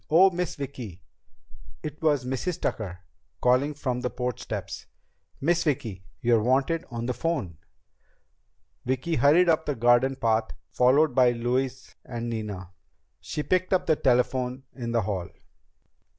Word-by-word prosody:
Oh, 185 +5 +6
Miss 175 -2 -2
Vicki!" 125 - -7 0.8
It 150 0 -6
was 145 -5 +2
Mrs. 135 +7 -2
Tucker, 90 -5 -3 0.4
calling 130 +4 +2
from 125 -4 -2
the 125 - -1
porch 125 0 -3
steps. - - -6 0.5
"Miss 170 +4 +2
Vicki, 110 - -2 0.2
you're 115 -2 +3
wanted 135 +8 +1
on 120 -2 -4
the 125 - -1
phone." 120 - -2 1.2
Vicki 130 +6 -1
hurried 160 +6 +5
up 160 -1 +2
the 145 - 0
garden 120 +3 +4
path, 110 -3 0 0.2
followed 130 - +4
by 125 -1 +5
Louise 125 +2 -2
and 120 -1 -5
Nina. 105 -5 -5 0.5
She 150 - -4
picked 185 +2 +1
up 185 -1 +2
the 155 - +3
telephone 125 0 +1
in 120 -3 -5
the 115 -2 +1
hall. 95 -3 -3
125 Hz, 140 wpm, -26 LUFS, 115-150 Hz, 1.2 s, Oh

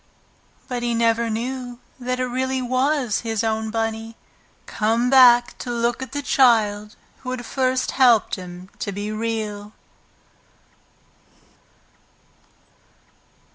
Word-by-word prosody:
But 245 -1 -3
he 240 -1 -1
never 230 0 +1
knew 245 +2 -4 0.2
that 255 0 -3
it 255 - +1
really 260 +1 -2
was 255 -1 0
his 225 -1 -2
own 220 0 -1
Bunny, 225 0 -3 0.5
come 230 +3 0
back 245 -2 +6
to - - -6
look 235 +1 -1
at 260 - -6
the 285 0 -4
child 215 -6 +2 0.2
who 255 - -7
had 255 -1 -4
first 255 0 0
helped 240 -5 +4
him 180 0 -7
to 200 - -3
be 205 +2 -4
Real. 215 -2 -4
235 Hz, 115 wpm, -22 LUFS, 220-255 Hz, 0.5 s, back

